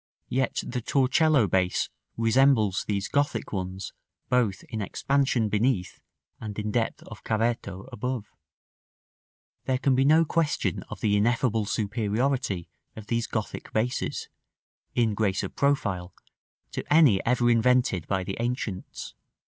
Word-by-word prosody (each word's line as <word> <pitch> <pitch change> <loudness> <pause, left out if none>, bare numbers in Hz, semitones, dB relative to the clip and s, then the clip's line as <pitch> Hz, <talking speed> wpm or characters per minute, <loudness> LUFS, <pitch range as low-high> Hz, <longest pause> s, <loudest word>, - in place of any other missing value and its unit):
Yet 130 0 0
the 125 0 -3
Torcello 135 +1 +3
base 90 -1 +1 0.3
resembles 115 -3 +3
these 100 -1 -1
Gothic 145 -4 -1
ones 95 0 -4 0.4
both 120 -7 +1
in 110 - -5
expansion 130 +1 +1
beneath 105 -2 0 0.4
and 105 -2 -6
in 105 0 -2
depth 115 0 -1
of 105 - -11
cavetto 110 -3 -1
above. 125 0 -2
§ - - -34
VIII. - - -34 1.4
There 130 - +1
can 135 +1 +2
be 130 +1 +3
no 155 +4 +5
question 160 -1 0
of - - -8
the 105 -1 +2
ineffable 115 0 +2
superiority 110 -1 -1 0.3
of 110 - -9
these 115 +1 -1
Gothic 110 -2 -4
bases, 120 +3 -1 0.7
in 115 -3 +2
grace 100 -2 0
of - - -6
profile, 100 -11 0 0.6
to - - -4
any 145 -11 +6
ever 120 0 +3
invented 115 -7 +2
by 95 -1 0
the 95 +1 -5
ancients. 120 -5 -4
115 Hz, 135 wpm, -27 LUFS, 100-130 Hz, 1.4 s, any